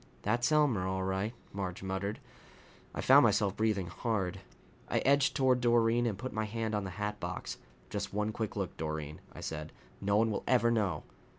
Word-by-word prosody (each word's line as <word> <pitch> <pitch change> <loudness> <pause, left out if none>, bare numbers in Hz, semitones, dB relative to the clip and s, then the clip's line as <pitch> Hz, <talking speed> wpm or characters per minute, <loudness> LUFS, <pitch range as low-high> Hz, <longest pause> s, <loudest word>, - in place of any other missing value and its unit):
"That's 120 +7 +1
Elmer, 135 -12 +3
all 95 0 -1
right," 95 +3 -1 0.2
Marge 95 -2 -4
muttered. 95 +2 -2 0.7
I - - -4
found 135 +2 +8
myself 105 -3 +3
breathing 110 -4 +1
hard. 95 +1 -2 0.5
I - - +1
edged 140 0 +3
toward 130 -3 +3
Doreen 120 0 +3
and 105 -4 -2
put 130 +4 -5
my 110 0 -1
hand 110 +1 -2
on 105 -1 0
the - - -4
hatbox. 105 0 -4 0.3
"Just 100 -1 -3
one 105 +1 0
quick 110 -2 -3
look, 100 -3 -3
Doreen," 75 -1 -4
I - - -10
said. 75 -1 -5 0.3
"No 100 +1 +2
one 110 +1 +3
will 105 - -2
ever 120 -2 +4
know." 105 -5 0
105 Hz, 180 wpm, -32 LUFS, 95-115 Hz, 0.7 s, found